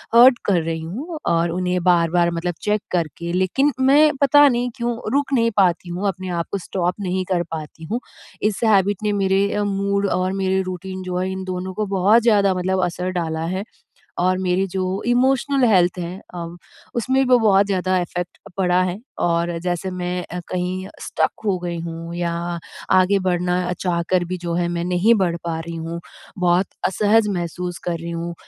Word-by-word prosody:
Hurt 245 Hz, +1 st, +8 dB
कर 185 Hz, -4 st, +3 dB
रही 165 Hz, 0 st, -2 dB
हूँ 280 Hz, -, -6 dB
और 165 Hz, 0 st, +1 dB
उन्हें 180 Hz, 0 st, -1 dB
बार-बार 170 Hz, -1 st, +3 dB
मतलब 170 Hz, +1 st, -2 dB
चेक 210 Hz, 0 st, +1 dB
करके। 170 Hz, 0 st, -2 dB
लेकिन 190 Hz, +11 st, +2 dB
मैं 290 Hz, +3 st, +6 dB
पता 290 Hz, +1 st, +7 dB
नहीं 245 Hz, 0 st, 0 dB
क्यों 235 Hz, 0 st, -1 dB, 0.2 s
रुक 285 Hz, -1 st, +1 dB
नहीं 230 Hz, -2 st, +3 dB
पाती 180 Hz, -2 st, +2 dB
हूँ, 185 Hz, +4 st, -2 dB
अपने 185 Hz, 0 st, -5 dB
आप 170 Hz, -1 st, -2 dB
को 200 Hz, -, 0 dB
स्टॉप 180 Hz, 0 st, -1 dB
नहीं 185 Hz, 0 st, -1 dB
कर 175 Hz, -1 st, +1 dB
पाती 160 Hz, 0 st, -7 dB
हूँ। 240 Hz, -, 0 dB, 0.4 s
इस 210 Hz, -1 st, 0 dB
हैबिट 200 Hz, -2 st, +3 dB
ने 210 Hz, -, +1 dB
मेरे 195 Hz, +1 st, +3 dB
अ, 210 Hz, -, 0 dB
मूड 200 Hz, 0 st, 0 dB
और 185 Hz, +1 st, 0 dB
मेरे 190 Hz, 0 st, +1 dB
रूटीन 185 Hz, +1 st, -6 dB
जो 180 Hz, -1 st, -3 dB
है, 185 Hz, +1 st, -1 dB
इन 190 Hz, 0 st, -4 dB
दोनों 185 Hz, 0 st, -4 dB
को 215 Hz, +2 st, -2 dB
बहुत 210 Hz, +6 st, +5 dB
ज़्यादा 205 Hz, -4 st, +4 dB
मतलब 185 Hz, +1 st, 0 dB
असर 180 Hz, +1 st, -3 dB
डाला 160 Hz, 0 st, -3 dB
है 195 Hz, -, -3 dB, 0.6 s
और 185 Hz, +1 st, +2 dB
मेरी 185 Hz, +1 st, +1 dB
जो 185 Hz, +1 st, -2 dB, 0.2 s
इमोशनल 265 Hz, +2 st, +2 dB
हेल्थ 180 Hz, -2 st, +3 dB
है 175 Hz, +1 st, -5 dB, 0.2 s
अ, 170 Hz, -1 st, -4 dB, 0.5 s
उसमें 260 Hz, +3 st, +2 dB
वो 250 Hz, -1 st, +5 dB
बहुत 200 Hz, -3 st, +4 dB
ज़्यादा 185 Hz, -1 st, +1 dB
इफेक्ट 175 Hz, 0 st, -5 dB, 0.2 s
पड़ा 180 Hz, -1 st, +3 dB
है 185 Hz, +2 st, -3 dB, 0.3 s
और 170 Hz, 0 st, 0 dB
जैसे 180 Hz, +1 st, -2 dB
मैं 180 Hz, 0 st, -3 dB
अ, 180 Hz, -, -3 dB
कहीं 185 Hz, +1 st, -2 dB
स्टक -, -, 0 dB
हो 195 Hz, -3 st, +2 dB
गई 175 Hz, -1 st, -4 dB
हूँ 165 Hz, 0 st, -6 dB
या 175 Hz, -1 st, -1 dB, 0.6 s
आगे 185 Hz, +2 st, +4 dB
बढ़ना 180 Hz, 0 st, +1 dB, 0.2 s
चाहकर 175 Hz, 0 st, 0 dB
भी 185 Hz, +1 st, -4 dB
जो 170 Hz, -1 st, -4 dB
है, 175 Hz, 0 st, +1 dB
मैं 170 Hz, 0 st, -2 dB
नहीं 180 Hz, +6 st, +3 dB
बढ़ 175 Hz, -3 st, +1 dB
पा 165 Hz, -1 st, -2 dB
रही 165 Hz, +1 st, -6 dB
हूँ। 165 Hz, +1 st, -5 dB, 0.4 s
बहुत 180 Hz, +1 st, +3 dB, 0.2 s
असहज 210 Hz, +3 st, +3 dB
महसूस 175 Hz, 0 st, -4 dB
कर 170 Hz, -1 st, -1 dB
रही 170 Hz, +1 st, -6 dB
हूँ 170 Hz, 0 st, -4 dB
185 Hz, 190 wpm, -21 LUFS, 175-200 Hz, 0.6 s, Hurt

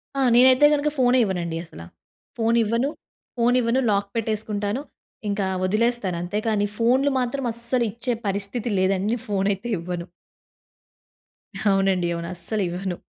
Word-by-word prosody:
ఆ! 275 Hz, -, 0 dB
నేనైతే 260 Hz, +3 st, +7 dB
గనుక 295 Hz, +1 st, +1 dB
ఫోనే 255 Hz, -1 st, +4 dB
ఇవ్వనండి 175 Hz, -4 st, -3 dB
అసల. 160 Hz, -, -12 dB, 0.6 s
ఫోన్ 230 Hz, +1 st, +2 dB
ఇవ్వను. 230 Hz, +5 st, 0 dB, 0.5 s
ఫోన్ 240 Hz, +1 st, +3 dB
ఇవ్వను 235 Hz, +3 st, +1 dB
లాక్ 200 Hz, 0 st, 0 dB
పెట్టేసుకుంటాను. 215 Hz, 0 st, -2 dB, 0.5 s
ఇంకా 200 Hz, -1 st, -1 dB, 0.2 s
వదిలేస్తాను 215 Hz, -2 st, 0 dB
అంతే 180 Hz, +4 st, -2 dB
కానీ, 210 Hz, -2 st, +2 dB
ఫోన్‌లు 260 Hz, +5 st, +3 dB
మాత్రం 255 Hz, +2 st, -2 dB
అస్సలు 235 Hz, +1 st, 0 dB
ఇచ్చే 240 Hz, +3 st, -2 dB
పరిస్థితి 200 Hz, +4 st, -2 dB
లేదండి. 190 Hz, +1 st, +1 dB
నేను 240 Hz, -, -4 dB
ఫోన్ 195 Hz, -1 st, 0 dB
అయితే 195 Hz, +5 st, -7 dB
ఇవ్వను. 175 Hz, 0 st, -5 dB, 1.6 s
అవునండి. 195 Hz, -3 st, +2 dB
అవును. 170 Hz, 0 st, -5 dB
అస్సలివ్వను. 180 Hz, -1 st, -3 dB
215 Hz, 135 wpm, -23 LUFS, 190-240 Hz, 1.6 s, నేనైతే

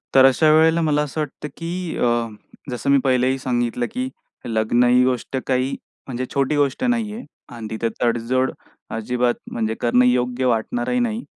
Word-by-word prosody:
तर 130 Hz, -1 st, +8 dB
अशा 155 Hz, +4 st, +5 dB
वेळेला 160 Hz, +1 st, +4 dB
मला 150 Hz, -2 st, +2 dB
असं 150 Hz, +2 st, -4 dB
वाटतं, 150 Hz, 0 st, -5 dB
की 170 Hz, +1 st, -4 dB
अ, 120 Hz, -1 st, +1 dB, 0.4 s
जसं 125 Hz, +2 st, -3 dB
मी 140 Hz, -, +6 dB
पहिलेही 130 Hz, 0 st, +2 dB
सांगितलं 120 Hz, -1 st, -1 dB
की 255 Hz, +1 st, -3 dB, 0.4 s
लग्न 115 Hz, +1 st, +2 dB
ही 125 Hz, +1 st, +5 dB
गोष्ट 130 Hz, +1 st, -1 dB
काही 130 Hz, +1 st, 0 dB, 0.3 s
म्हणजे 130 Hz, -1 st, -3 dB
छोटी 140 Hz, +1 st, +1 dB
गोष्ट 145 Hz, -, 0 dB
नाहीये 235 Hz, -1 st, -1 dB, 0.3 s
अन 115 Hz, -2 st, -6 dB
तिथं 110 Hz, +1 st, -2 dB
तडजोड 120 Hz, +2 st, +1 dB, 0.4 s
अजिबात 120 Hz, +2 st, 0 dB, 0.2 s
म्हणजे 110 Hz, -1 st, -2 dB
करणं 125 Hz, +1 st, +4 dB
योग्य 125 Hz, +1 st, +1 dB
वाटणारही 120 Hz, -, 0 dB
नाही. 235 Hz, 0 st, -1 dB
130 Hz, 160 wpm, -21 LUFS, 120-150 Hz, 0.4 s, तर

